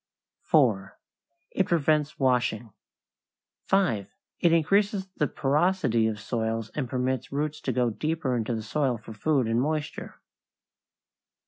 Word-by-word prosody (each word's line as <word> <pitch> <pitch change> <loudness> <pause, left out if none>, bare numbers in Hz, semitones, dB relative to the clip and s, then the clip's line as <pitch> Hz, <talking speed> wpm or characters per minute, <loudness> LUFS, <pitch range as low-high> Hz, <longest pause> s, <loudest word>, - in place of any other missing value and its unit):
4. 110 -10 +2 0.5
It 190 - 0
prevents 155 -2 +1
washing. 125 -4 +1 0.9
5. 120 - +1 0.2
It 170 - +3
increases 195 +4 +2
the 150 - +2
porosity 145 -5 +1
of 110 -1 -3
soils 110 0 -2
and 135 -5 -3
permits 130 0 -2
roots 150 +2 -2
to 130 - -1
go 125 -1 +1
deeper 150 +1 -1
into 115 0 -1
the 110 - -4
soil 130 +1 0
for 110 0 -11
food 135 +4 +1
and 115 +2 +1
moisture. 155 +2 -3
130 Hz, 125 wpm, -27 LUFS, 115-155 Hz, 0.9 s, It